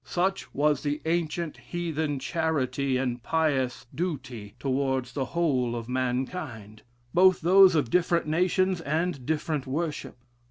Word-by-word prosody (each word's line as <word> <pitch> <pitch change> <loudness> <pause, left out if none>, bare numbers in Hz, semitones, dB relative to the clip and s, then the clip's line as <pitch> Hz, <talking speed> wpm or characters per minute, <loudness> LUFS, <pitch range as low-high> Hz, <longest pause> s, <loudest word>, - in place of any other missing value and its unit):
Such 190 +2 -1
was 145 -1 +1
the 145 0 -2
ancient 165 -1 -1
heathen 160 -4 -3
charity 140 -4 -1
and 125 -2 -2
pious 135 -5 0
duty 130 - -4
towards 130 -2 -1
the 135 -2 -1
whole 130 -7 0
of 115 -1 -5
mankind; 125 - -3 0.3
both 185 +1 +5
those 185 +1 +7
of 145 -7 +1
different 175 -1 +2
nations 180 +3 +1
and 155 -3 -2
different 150 -2 -1
worship. 150 +1 -3
150 Hz, 125 wpm, -27 LUFS, 130-170 Hz, 0.3 s, those